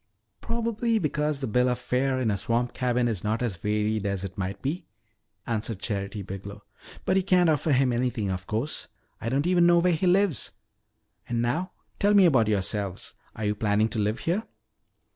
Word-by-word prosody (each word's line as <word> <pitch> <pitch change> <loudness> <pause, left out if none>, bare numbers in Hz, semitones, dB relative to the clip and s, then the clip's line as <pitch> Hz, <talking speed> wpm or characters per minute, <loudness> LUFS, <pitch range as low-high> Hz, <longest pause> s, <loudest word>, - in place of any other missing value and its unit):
"Probably 230 0 0
because 150 -5 -1
the 135 - -1
bill 125 +3 +2
of 125 - 0
fare 130 +1 0
in 115 -4 +1
a 100 - 0
swamp 120 +4 -1
cabin 125 -1 +1
is 110 -7 -2
not 110 +3 0
as 110 -7 -1
varied 105 +2 0
as 100 -1 -2
it 95 -1 -6
might 100 +1 -3
be," 150 - -3 0.6
answered 115 -2 -2
Charity 100 0 -3
Biglow. 100 +2 -8 0.4
"But 190 - +2
you 190 - +2
can't 180 -3 +4
offer 155 +1 +1
him 130 -2 +3
anything, 120 -4 -1
of 95 +1 -5
course. 115 +8 -2 0.3
I 115 - -2
don't 140 +4 +1
even 175 -1 +4
know 175 0 +6
where 175 +1 +3
he 165 +3 0
lives. 180 - +2 0.8
And 120 -1 0
now, 150 +11 -1 0.3
tell 205 +1 +4
me 195 -2 +7
about 130 -10 +4
yourselves. 100 -2 -1 0.2
Are 110 - -4
you 105 - +2
planning 105 +1 +1
to 110 - -2
live 105 +2 0
here?" 195 +7 -1
120 Hz, 190 wpm, -27 LUFS, 105-160 Hz, 0.8 s, me